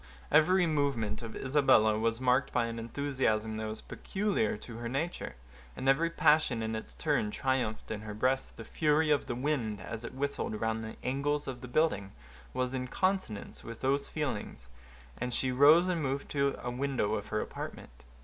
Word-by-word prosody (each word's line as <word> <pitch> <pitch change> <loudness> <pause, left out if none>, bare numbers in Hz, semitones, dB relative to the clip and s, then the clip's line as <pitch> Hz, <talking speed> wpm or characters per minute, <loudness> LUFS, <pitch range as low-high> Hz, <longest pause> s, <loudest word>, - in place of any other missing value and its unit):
Every 175 +5 +5
movement 135 -9 0
of 115 -2 -7
Isabella 130 -6 +4
was 115 +1 +1
marked 130 +1 +2
by 120 -1 +2
an 115 0 -4
enthusiasm 115 -3 -1
that 110 0 -3
was 110 0 -5
peculiar 195 - -1
to 115 +2 -9
her 120 0 -4
nature, 140 - -3 0.4
and 130 - -4
every 155 +5 +4
passion 150 -7 +3
in 110 0 -2
its 110 - -6
turn - - +1
triumphed 125 -2 -1
in 105 -1 -3
her 105 -1 -6
breast. 130 +4 0
The 115 - -7
fury 150 +6 +2
of 145 - +2
the - - -2
wind, 125 -6 -1
as 115 +4 -6
it 125 - -7
whistled 135 -5 -2
round 110 0 -1
the 110 - -6
angles 145 +3 0
of 125 -2 -5
the 125 - -7
building, 120 -8 +1 0.4
was 130 0 -1
in 130 -1 -2
consonance 185 - -1
with 115 -1 -8
those 140 +2 +1
feelings, 135 - -4 0.5
and 125 -1 -2
she 130 - 0
rose 150 +7 +7
and 175 -3 0
moved 140 0 -2
to 140 -1 +1
a 125 - -2
window 125 -4 0
of 105 -2 -2
her - - -1
apartment. - - -6
130 Hz, 185 wpm, -31 LUFS, 110-145 Hz, 0.5 s, rose